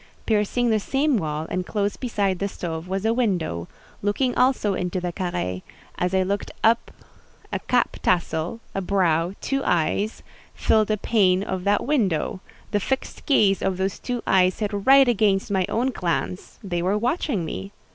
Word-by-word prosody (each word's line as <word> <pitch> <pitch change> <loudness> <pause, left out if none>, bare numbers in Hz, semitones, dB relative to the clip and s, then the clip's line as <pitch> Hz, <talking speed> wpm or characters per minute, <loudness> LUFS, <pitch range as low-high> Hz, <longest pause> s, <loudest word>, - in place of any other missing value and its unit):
Piercing 225 +2 +1
the 215 - +3
same 275 +6 +1
wall, 155 -5 -2
and 185 - -1
close 205 +1 -1
beside 200 -7 -1
the 200 - 0
stove, 165 -3 -5
was 190 +2 -2
a 225 - +3
window, 175 - -1 0.3
looking 245 +5 +1
also 250 -5 +2
into 180 0 -2
the 175 -1 -3
carré; 175 - -3 0.4
as 180 +1 0
I 190 - +3
looked 200 +2 -2
up 230 +1 +3 0.6
a - - 0
cap - - 0
tassel, 170 +4 0
a 195 - -2
brow, 175 -2 +1
two 275 0 -1
eyes, 185 +6 0 0.3
filled 215 -1 +2
a 215 - +1
pane 195 -3 +2
of 190 -2 -4
that 205 +1 +2
window; 195 - 0 0.3
the 205 - +2
fixed 265 +6 -3
gaze 205 -9 +4
of 190 -1 0
those 190 0 -2
two 245 -2 -3
eyes 185 -1 +3
hit 210 -1 -2
right 265 +7 +6
against 205 -4 +2
my 190 -2 +1
own 250 +4 +1
glance: 180 -2 -3
they 175 -3 -2
were 190 +4 +1
watching 235 - -1
me. 95 -9 -6
195 Hz, 170 wpm, -24 LUFS, 180-225 Hz, 0.6 s, right